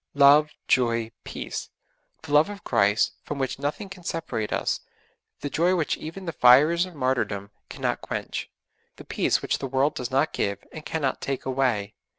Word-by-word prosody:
Love, 145 Hz, +2 st, +7 dB, 0.2 s
joy, 115 Hz, -2 st, +2 dB
peace; -, -, -6 dB, 0.5 s
the 145 Hz, -, -6 dB
love 150 Hz, +5 st, +5 dB
of 205 Hz, -2 st, -8 dB
Christ 105 Hz, -1 st, +3 dB
from 145 Hz, -, -5 dB
which 135 Hz, -1 st, -2 dB
nothing 145 Hz, +8 st, -3 dB
can 190 Hz, -1 st, -11 dB
separate 160 Hz, -11 st, -3 dB
us; -, -, 0 dB, 0.6 s
the -, -, -2 dB
joy 175 Hz, +3 st, +3 dB
which 160 Hz, -4 st, 0 dB
even 175 Hz, +5 st, -8 dB
the 165 Hz, -, -2 dB
fires 150 Hz, +9 st, +6 dB
of 180 Hz, -, -13 dB
martyrdom 125 Hz, -7 st, -1 dB, 0.2 s
cannot -, -, -2 dB
quench; -, -, -4 dB, 0.5 s
the -, -, -12 dB
peace -, -, +1 dB
which -, -, 0 dB
the 135 Hz, -, -3 dB
world 135 Hz, +3 st, +1 dB
does 125 Hz, -1 st, -4 dB
not 135 Hz, +4 st, +1 dB
give, 100 Hz, -1 st, -2 dB
and 155 Hz, -, -8 dB
cannot 145 Hz, -5 st, -1 dB
take 135 Hz, -1 st, -3 dB
away. 130 Hz, -6 st, 0 dB
140 Hz, 170 wpm, -25 LUFS, 125-160 Hz, 0.6 s, Love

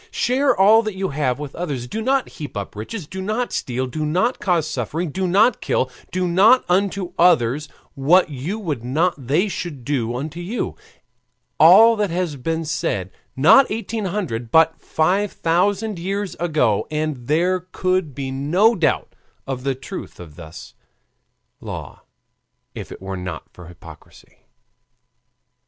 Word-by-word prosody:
Share 260 Hz, -, +1 dB
all 215 Hz, +4 st, +7 dB
that 215 Hz, -3 st, -4 dB
you 190 Hz, 0 st, -2 dB
have 140 Hz, -3 st, -1 dB
with 145 Hz, -2 st, -7 dB
others, 145 Hz, -8 st, -4 dB
do 215 Hz, -, -5 dB
not 265 Hz, +3 st, +1 dB
heap 145 Hz, -8 st, -8 dB
up 100 Hz, 0 st, -6 dB
riches, 150 Hz, -, -6 dB
do 190 Hz, +5 st, -7 dB
not 215 Hz, +5 st, -2 dB
steal, 130 Hz, +1 st, -2 dB
do 155 Hz, +5 st, -4 dB
not 185 Hz, +12 st, 0 dB
cause 170 Hz, -5 st, +1 dB
suffering, 150 Hz, +7 st, -3 dB
do 190 Hz, +4 st, -1 dB
not 210 Hz, +6 st, +3 dB
kill, 130 Hz, -, 0 dB, 0.2 s
do 180 Hz, 0 st, -1 dB
not 205 Hz, +9 st, +5 dB
unto 190 Hz, 0 st, 0 dB
others 150 Hz, -4 st, +3 dB, 0.2 s
what 155 Hz, +5 st, +3 dB
you 145 Hz, +10 st, -4 dB
would 155 Hz, -, -4 dB
not 160 Hz, +8 st, +1 dB
they 165 Hz, +10 st, +2 dB
should 155 Hz, -, -6 dB
do 120 Hz, -4 st, -1 dB
unto 155 Hz, +6 st, -5 dB
you, 190 Hz, +8 st, -4 dB, 0.8 s
all 230 Hz, +1 st, +8 dB
that 210 Hz, -2 st, 0 dB
has 170 Hz, -3 st, -2 dB
been 160 Hz, +5 st, -3 dB
said 100 Hz, -, -2 dB, 0.2 s
not 160 Hz, -, +6 dB
eighteen 225 Hz, -1 st, -3 dB
hundred, 170 Hz, -, -3 dB
but 160 Hz, +3 st, +3 dB
five 190 Hz, +6 st, 0 dB
thousand 195 Hz, +4 st, 0 dB
years 195 Hz, +2 st, -3 dB
ago, 150 Hz, -11 st, +1 dB
and 150 Hz, -5 st, -3 dB
there 175 Hz, +5 st, +2 dB
could 185 Hz, -6 st, -1 dB
be 135 Hz, -2 st, -4 dB
no 170 Hz, -, +3 dB
doubt 175 Hz, -8 st, 0 dB, 0.3 s
of 130 Hz, -2 st, -5 dB
the 135 Hz, -1 st, -1 dB
truth 130 Hz, -, -8 dB
of 80 Hz, -4 st, -11 dB
this 80 Hz, -2 st, -11 dB, 0.9 s
law -, -, -8 dB, 0.7 s
if -, -, -8 dB
it -, -, -10 dB
were 95 Hz, 0 st, -4 dB
not 90 Hz, -3 st, -6 dB
for 90 Hz, -2 st, -12 dB
hypocrisy. 85 Hz, -3 st, -16 dB
165 Hz, 155 wpm, -21 LUFS, 130-195 Hz, 0.9 s, all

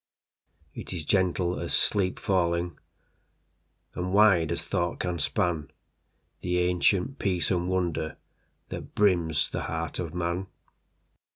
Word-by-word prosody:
It -, -, -7 dB
is 85 Hz, -4 st, -4 dB
gentle 90 Hz, -1 st, +1 dB
as -, -, -1 dB
sleep 95 Hz, -3 st, +2 dB
fallingAnd 85 Hz, -2 st, +1 dB, 1.2 s
wide 90 Hz, -2 st, +4 dB
as -, -, -2 dB
thought 85 Hz, 0 st, -1 dB
can 90 Hz, -2 st, -2 dB
span, 80 Hz, -2 st, 0 dB, 0.7 s
The 90 Hz, 0 st, 0 dB
ancient 90 Hz, +7 st, +2 dB
peace 90 Hz, -3 st, 0 dB
and 90 Hz, -1 st, 0 dB
wonderThat 85 Hz, -4 st, -5 dB
brims 85 Hz, -6 st, +2 dB
the -, -, -2 dB
heart 80 Hz, 0 st, -3 dB
of 85 Hz, -2 st, -4 dB
man. 90 Hz, +2 st, -1 dB
90 Hz, 110 wpm, -28 LUFS, 85-95 Hz, 1.2 s, wide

